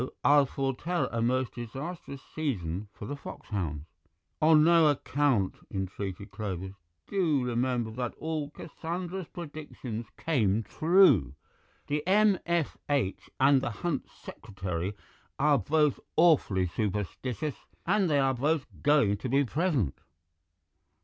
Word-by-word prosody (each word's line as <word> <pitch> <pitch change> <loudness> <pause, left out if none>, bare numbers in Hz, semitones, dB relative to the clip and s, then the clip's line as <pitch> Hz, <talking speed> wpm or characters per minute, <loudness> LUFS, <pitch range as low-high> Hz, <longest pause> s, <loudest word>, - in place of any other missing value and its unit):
I'll 145 -1 +6
foretell 135 +7 -1
a 115 - -1
most 130 +2 +1
disastrous 135 +4 -7
season 105 - -2
for 105 - -9
the 145 - -4
foxhounds." 85 - -5 0.6
"On 155 -1 +6
no 165 -1 +6
account," 140 -7 +1 0.2
entreated 95 0 -5
Clovis; 95 -3 -4 0.3
"do 160 -10 +1
remember 120 -1 0
that 120 +1 -4
all 155 -2 -3
Cassandra's 175 +3 -5
predictions 145 - -7
came 115 -9 +1
true. 160 - +4 0.5
The 150 +1 -1
M.F.H. 170 - +1
and 135 0 +5
the - - -1
Hunt 140 +6 -3
Secretary 95 -1 -5 0.4
are 145 -1 +4
both 150 +5 +2 0.2
awfully 150 - +4
superstitious, 105 - -3 0.2
and 195 0 +2
they 145 - +3
are 135 -1 +3
both 145 +3 0 0.2
going 140 -9 +4
to 125 - -4
be 140 +3 +3
present." 140 - 0
135 Hz, 115 wpm, -29 LUFS, 105-155 Hz, 0.6 s, I'll